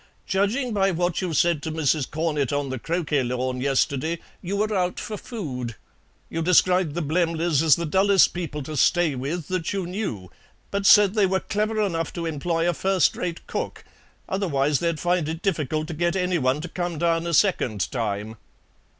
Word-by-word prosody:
"Judging 215 +6 0
by 195 -1 +2
what 175 0 0
you 180 -2 -2
said 165 0 +2
to 160 - -4
Mrs. 155 -3 0
Cornett 150 -4 -1
on 145 -1 -1
the 130 - -4
croquet 160 -2 0
lawn 125 0 -2
yesterday, 140 +4 0 0.2
you 195 +2 -3
were 215 +1 0
out 180 -1 0
for 215 - -5
food. 130 - -5 0.5
You 165 - -3
described 180 -1 +3
the 175 - -1
Blemleys 165 -1 +1
as 160 -4 +6
the 170 - -3
dullest 190 +3 +4
people 155 -4 -4
to 155 +3 -6
stay 170 +3 +3
with 140 +5 -4
that 185 -2 -2
you 195 -2 -2
knew, 175 - -4 0.4
but 200 0 0
said 205 -2 +7
they 210 -3 +3
were 190 0 +1
clever 215 +2 -1
enough 165 -6 -1
to 170 - -4
employ 165 +2 -1
a 175 - +2
first 190 +1 +2
rate 175 -2 -4
cook; - - -5 0.4
otherwise 150 -7 0
they'd 170 -2 -1
find 175 -2 0
it 165 +2 -5
difficult 155 -5 -1
to - - -3
get 170 +3 0
anyone 170 -7 +1
to 180 - -5
come 175 -1 -3
down 165 +1 +1
a 170 - -2
second 120 - +1
time." 110 -2 -3
170 Hz, 185 wpm, -24 LUFS, 145-185 Hz, 0.5 s, said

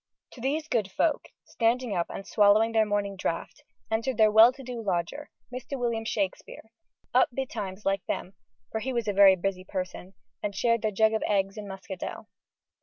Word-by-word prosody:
To 240 - -12
these 300 +5 -1
good 220 -9 0
folk, 305 +9 +1 0.2
standing 235 -1 0
up 170 - 0
and 195 - -7
swallowing 215 +1 +4
their 220 -1 +3
morning 205 -1 -1
draught, 170 -3 -4 0.3
entered 230 +2 -1
their 215 -1 +5
well 220 +3 +8
to 270 - -12
do 245 -2 -6
lodger, 200 - -2 0.2
Mr. 255 +2 -5
William 230 -2 -1
Shakespeare, 210 +1 -4 0.4
up 255 - +5
betimes 210 -6 -5
like 195 -1 +1
them 185 - -3 0.4
for 220 - -2
he 260 +4 -3
was 235 -2 -1
a 205 - +1
very 195 -1 +7
busy 185 0 -3
person, 185 0 -6 0.3
and 205 -1 -3
shared 230 +2 +2
their 215 - +1
jug 220 +2 +3
of 220 - 0
eggs 195 -1 +1
and 210 -2 -7
muscadel. 190 -1 -7
215 Hz, 180 wpm, -27 LUFS, 195-235 Hz, 0.4 s, well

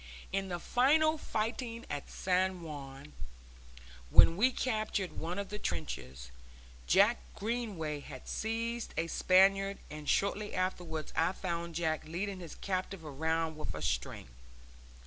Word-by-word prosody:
In 195 0 0
the 175 -2 -2
final 310 - +3
fighting 230 +1 -2
at 145 -1 -5
San 185 -1 0
Juan, 140 -2 -8 1.0
when 165 - +8
we 240 +8 +4
captured 215 -6 -1
one 175 +3 -3
of 200 -1 -3
the 210 - -5
trenches, 65 - -4 0.6
Jack 65 - +5 0.2
Greenway 205 -10 -2
had 140 -2 -10
seized 230 +1 -2
a 160 - +2
Spaniard, 195 +3 +4
and 150 -1 -5
shortly 205 +1 +1
afterwards 175 -4 -2
I 165 +3 +2
found 170 -3 -3
Jack 160 -2 0
leading 185 +4 -3
his 170 -4 -8
captive 185 -2 -3
round 160 +2 -1
with 90 - -5
a 80 - -5
string. 75 -3 -2
185 Hz, 130 wpm, -33 LUFS, 155-205 Hz, 1.0 s, when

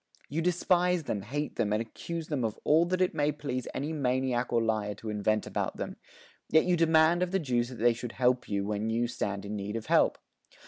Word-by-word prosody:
You 155 +4 -1
despise 180 0 +2
them, 105 -7 -2
hate 145 +9 -4
them, 110 -3 +1
and 105 - +2
accuse 160 +8 -5
them 145 -5 -1
of 110 -1 -2
all 160 +3 +4
that 185 +1 -1
it 185 - +2
may 150 -1 +1
please 135 -4 -4
any 150 +4 -3
maniac 130 -3 0
or 120 - +3
liar 110 -2 -1
to 110 +1 -6
invent 105 +1 0
about - - -3
them. - - -4 0.5
Yet 160 - +5
you 180 -1 +3
demand 165 +1 +4
of 180 - +1
the 195 - +1
Jews 125 -8 0
that 130 - -8
they 120 +1 +3
should 120 0 -6
help 125 0 +1
you, 100 -1 -1
when 105 +1 -2
you 115 +2 +1
stand 100 -4 -3
in 105 +1 -4
need 105 +1 -4
of 115 - -4
help. - - +3
125 Hz, 225 wpm, -29 LUFS, 110-160 Hz, 0.5 s, Yet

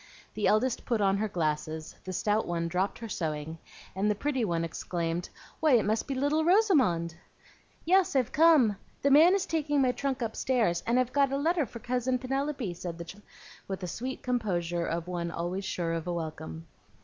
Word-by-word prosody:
The 210 - 0
eldest 235 +3 +2
put 235 -3 0
on 195 -1 +3
her 215 +2 0
glasses, 155 -3 -2
the 185 - -4
stout 210 +4 0
one 170 -1 -1
dropped 185 +3 -1
her 230 - -7
sewing, 160 -4 -4 0.4
and 200 +2 +1
the 210 - +2
pretty 265 +2 -1
one 170 -5 0
exclaimed, 170 +1 -3 0.3
"Why, 310 -4 +4
it 235 - +4
must 215 +2 0
be 275 - -2
little 290 +4 +1
Rosamond!" 290 - +3 0.7
"Yes, 370 -2 +3
I've 255 -4 +2
come; 295 -10 +5 0.3
the 280 - +3
man 325 +7 +7
is 395 - 0
taking 295 -3 0
my 260 -2 +4
trunk 265 -1 -2
upstairs, 225 -5 0
and 240 +2 +3
I've 255 0 0
got 280 -2 +3
a 275 - 0
letter 320 0 +1
for 235 - -9
Cousin 250 +2 -1
Penelope," 270 -4 -2
said 175 -1 -6
the 170 - -6
child, 195 +5 -11 0.5
with 190 0 -4
the 180 - -3
sweet 255 +9 -5
composure 175 -9 -1
of 165 +1 -3
one 175 -1 -3
always 175 +4 -3
sure 170 -3 -2
of 165 +1 -3
a 175 - -1
welcome. 155 - -6
215 Hz, 195 wpm, -29 LUFS, 170-270 Hz, 0.7 s, man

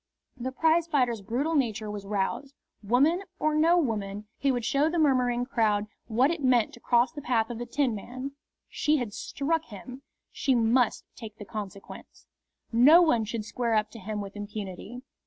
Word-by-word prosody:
The 260 0 -4
prizefighter's 295 -6 +2
brutal 255 +11 -1
nature 225 -7 0
was 200 -1 -7
roused. 210 +8 -2 0.3
Woman 270 - +3 0.2
or 310 0 +1
no 325 +3 +4
woman, 210 - -2
he 275 - +2
would 245 -3 -2
show 275 +6 +2
the 345 - -2
murmuring 250 -5 +2
crowd 215 -5 +1 0.2
what 250 +6 +3
it 335 -2 -3
meant 245 -4 +3
to - - -12
cross 240 +1 +2
the 300 -2 -8
path 240 -3 0
of 235 - -6
the 240 - -5
Tinman. 255 0 -2 0.4
She 305 0 +1
had 240 -6 -4
struck 320 +8 -2
him. 245 +5 -10 0.3
She 265 - +1
must 235 +1 +2
take 220 -3 -10
the 205 - -9
consequence. 200 -2 -9 0.5
No 285 +10 +7
one 240 -9 +2
should 220 0 -4
square 230 +1 -1
up 215 0 +1
to 230 - -10
him 210 +1 -4
with 200 0 -8
impunity. 205 +3 -7
240 Hz, 175 wpm, -27 LUFS, 215-280 Hz, 0.5 s, No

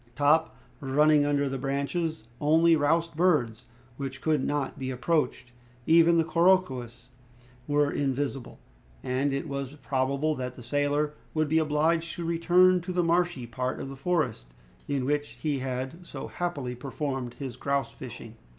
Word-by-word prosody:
Top, 150 +2 +3 0.2
running 145 +2 +3
under 145 -1 +1
the 135 0 -3
branches, 140 +3 -2 0.2
only 160 +3 +4
roused 165 +2 +1
birds 135 -10 +1 0.3
which 135 -1 -5
could 150 -2 +1
not 145 -2 -2
be 130 -1 -3
approached. 130 -1 -1 0.3
Even 170 +1 +5
the 165 - +4
couroucous 155 -9 +1 0.6
were 145 0 +2
invisible, 135 -2 -2 0.5
and 130 +3 0
it 140 +3 -2
was 140 -1 -4
probable 140 +2 0
that 125 -3 -5
the 125 - -11
sailor 145 +3 0 0.2
would 155 -1 +2
be 160 +1 +3
obliged 160 +2 +1
to 170 - -5
return 180 +2 +4
to 180 +2 -5
the 180 -1 +1
marshy 170 -6 +1
part 125 +2 -3
of 135 - -5
the 135 - -7
forest, 130 - -2 0.3
in 140 -3 -1
which 145 +1 -1
he 145 -3 -1
had 130 +6 -4
so - - -7
happily 145 -8 -3
performed 130 -1 -4
his 130 -4 -6
grouse 140 +1 -1
fishing. 115 -3 -10
145 Hz, 150 wpm, -28 LUFS, 130-160 Hz, 0.6 s, Even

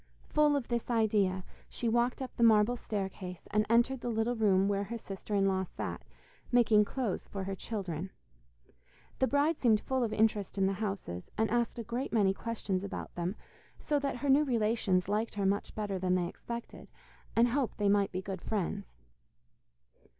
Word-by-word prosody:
Full 300 -1 +4
of 275 -4 -1
this 235 0 -2
idea 205 -5 +2 0.3
she 240 - -3
walked 240 +3 +1
up 255 - -8
the - - -4
marble 220 +1 +5
staircase, 190 -5 -5
and 210 0 +2
entered 240 +2 +3
the 245 - -2
little 225 +1 0
room 195 -4 +3
where 200 0 0
her 235 +4 -5
sister 205 -1 -5
in 195 -1 +3
law 190 -1 +1
sat, 190 - -5 0.5
making 225 -4 +5
clothes 235 -4 -3
for 195 -1 -5
her 195 +1 -3
children. 190 -3 -4 1.1
The 260 - +3
bride 290 +3 +2
seemed 220 -4 +5
full 260 +2 -1
of 225 - -1
interest 215 -3 +1
in 195 - +3
the 195 - +2
houses, 195 - -4
and 220 0 +1
asked 240 0 +1
a 235 - -3
great 235 +4 -3
many 200 -4 +3
questions 200 -3 -3
about 200 - -6
them, 175 +3 -2 0.4
so 295 -2 0
that 280 -3 -2
her 280 +3 -2
new 285 +3 +6
relations 215 -7 +1
liked 210 +3 -1
her 200 -1 -1
much 200 +2 0
better 205 -3 -2
than 180 0 +1
they 175 -1 +1
expected, 235 +6 -7 0.5
and 235 +1 +5
hoped 255 0 -1
they 205 - +1
might 200 0 +3
be 185 +1 -3
good 190 -1 -5
friends. 200 - -2
215 Hz, 185 wpm, -31 LUFS, 195-235 Hz, 1.1 s, new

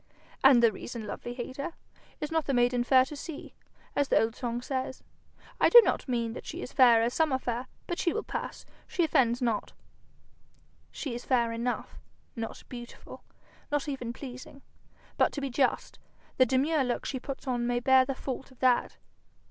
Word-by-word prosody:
'And 265 -3 +7
the 230 - +6
reason, 225 +2 -7
lovely 240 +3 -6
hater? 260 +5 -5 0.5
"Is 300 - -4
not 320 -1 +1
the 275 - +1
maiden 245 0 +3
fair 255 +1 +5
to 295 - -8
see?" 295 +1 -8 0.4
as 285 - +2
the - - +4
old 225 +1 0
song 240 -2 -3
says. 260 +1 -4 0.6
I - - +5
do 480 - +11
not - - -1
mean 235 -3 -1
that - - -8
she - - -5
is - - -8
fair 235 -3 +6
as 235 +1 0
some 320 -2 +2
are 260 - +2
fair, 245 0 -3 0.2
but 345 - -4
she 340 - +1
will 445 - -2
pass; - - -5 0.2
she 350 - 0
offends 255 -6 +2
not.' 230 -3 -1 1.2
'She 275 -6 -5
is 240 - -6
fair 240 -3 +2
enough 235 +2 -3 0.4
not 225 -2 -6
beautiful, 240 -1 -10 0.5
not 290 0 0
even 260 -5 -4
pleasing; 255 +2 -10 0.5
but, - - +3
to - - -3
be 275 -1 -3
just, 260 +1 0 0.4
the 255 - +5
demure 275 +4 +2
look 245 -1 -2
she 260 - -3
puts 275 +2 -7
on 245 -2 -1
may 245 0 +1
bear 260 +1 +5
the 270 +1 -3
fault 265 0 -5
of 260 - -19
that. 250 -1 +2
255 Hz, 190 wpm, -29 LUFS, 240-275 Hz, 1.2 s, do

